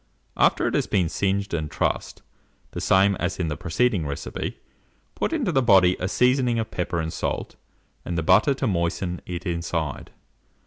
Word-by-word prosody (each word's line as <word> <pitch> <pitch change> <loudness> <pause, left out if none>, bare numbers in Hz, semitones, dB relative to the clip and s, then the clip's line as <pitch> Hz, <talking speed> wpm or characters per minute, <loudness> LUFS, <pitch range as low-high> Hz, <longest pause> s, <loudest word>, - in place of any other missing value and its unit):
After - - +3
it - - 0
has - - +1
been 90 -5 +1
singed 100 +2 -1
and 80 -2 -2
trussed, - - -2 0.5
the - - -5
same 95 +1 +4
as 90 +1 -2
in 85 -3 -1
the 75 - -2
preceding 95 0 0
recipe, 70 - -5 0.6
put - - -2
into 280 - 0
the 135 -4 +3
body 95 -6 +5
a 90 - -1
seasoning 125 +2 +2
of 110 -1 -3
pepper 90 -1 -2
and 80 0 -3
salt, - - -3 0.5
and 85 - -3
the 85 - 0
butter 105 - +4
to 135 - -2
moisten 90 -2 -1
it 90 -1 -5
inside. 85 -4 -3
90 Hz, 175 wpm, -24 LUFS, 85-110 Hz, 0.6 s, body